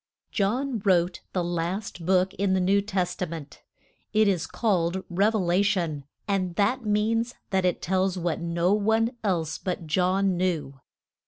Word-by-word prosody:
JOHN 235 +4 0
wrote 180 -2 +2
the 180 - 0
last 175 +1 -3
book 185 0 +3
in 195 -1 +1
the - - +2
New 195 +2 +3
Tes 195 -3 -1
ta 180 - -3
ment. 160 -3 -8 0.5
It 215 0 +4
is 185 -5 +1
called 190 -4 0
Rev 205 +5 +2
e - - +3
la 180 -1 +2
tion; 170 -8 0 0.2
and 185 -3 0
that 230 +6 +1
means 225 +3 +1 0.2
that 190 -1 +2
it 180 - 0
tells 190 +1 +1
what 170 -3 -1
no 170 +2 +1
one 220 +2 +2
else 170 -5 -1
but 180 -3 -3
John 185 +4 +2
knew. 155 -7 -1
185 Hz, 165 wpm, -26 LUFS, 175-205 Hz, 0.5 s, It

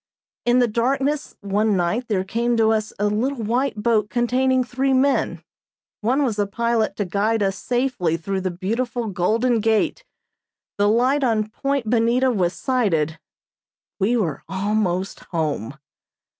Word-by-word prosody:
In 240 +1 +4
the 245 -1 +4
darkness 270 +6 -1
one 205 +1 +1
night 180 +8 -1
there 195 -4 0
came 235 +4 0
to 220 -1 +4
us 220 -1 0
a 205 - 0
little 230 +4 -1
white 240 +3 0
boat 215 -3 +2
containing 255 +2 +2
three 265 +2 0
men, 270 +2 +1 0.6
one 255 +7 +1
was 225 -6 -1
a 205 - +1
pilot 230 0 0
to 205 - -2
guide 210 +4 0
us 195 0 0
safely 245 -11 -1
through 190 +4 -3
the 185 - -1
beautiful 230 +7 -2
Golden 220 +5 +1
Gate; 225 - +1 0.8
the 205 0 +4
light 255 +6 +2
on 220 -4 +1
Point 275 +1 -2
Bonita 240 +3 +2
was 180 -6 0
sighted 170 - 0 0.8
we 220 +5 +2
were 170 -10 -1
almost 195 -1 -1
home. 150 - -3
220 Hz, 145 wpm, -22 LUFS, 195-245 Hz, 0.8 s, In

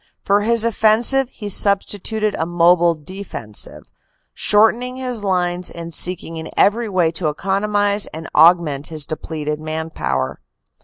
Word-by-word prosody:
For 200 +1 +3
his 230 +1 +3
offensive 230 +4 +2
he 210 -5 -8
substituted 205 +2 +1
a 160 - -2
mobile 175 0 +3
defensive, 155 - -7 0.5
shortening 235 +4 +2
his 250 -4 -4
lines 180 -2 -1
and 170 0 -8
seeking 175 -2 -1
in 160 0 -7
every 220 +2 +2
way 180 -4 +1
to 165 -1 -1
economize 200 +4 0
and 160 +1 -8
augment 155 -3 +4
his 155 -3 -1
depleted 155 -1 -5
man 160 +1 -5
power. 65 - -3
185 Hz, 135 wpm, -19 LUFS, 160-210 Hz, 0.5 s, augment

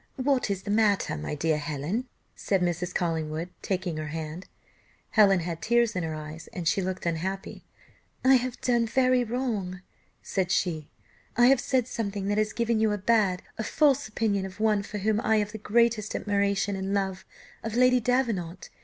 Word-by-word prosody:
"What 265 -3 +1
is 195 -1 -2
the 205 - -3
matter, 210 - +2
my 75 - -4
dear 155 +1 +1
Helen?" 155 - -3 0.3
said 195 -2 0
Mrs. 175 0 -1
Collingwood, 165 -1 -2
taking 180 -4 -2
her 155 -1 -4
hand. 160 +3 -6 0.6
Helen 195 -4 +5
had 165 -1 -4
tears 235 -1 +2
in 180 - 0
her 160 -2 -3
eyes 155 +1 -8
and 175 -6 -4
looked 185 -1 -2
unhappy. 185 +4 -3 0.6
"I 265 - +7
have 250 0 -4
done 240 -2 +2
very 255 +1 +3
wrong," 220 -7 -3 0.4
said 190 -2 -1
she; 165 -5 0 0.5
"I 240 - +6
have 270 -1 +4
said 255 -3 +1
something 200 -4 -3
that 205 +1 +1
has 215 0 +1
given 235 -1 0
you 220 -1 +3
a 210 - 0
bad, 200 -3 +2 0.2
a - - 0
false 280 +2 +2
opinion 210 -2 0
of 190 0 -8
one 215 -2 +2
for 210 +1 -6
whom 215 +2 +1
I 220 -1 +2
have 210 -1 0
the 220 - -7
greatest 225 0 +1
admiration 200 -1 0
and 195 +1 -2
love 190 -1 -1 0.4
of 225 0 -4
Lady 250 0 +5
Davenant. 225 -8 -1
200 Hz, 180 wpm, -27 LUFS, 180-230 Hz, 0.6 s, I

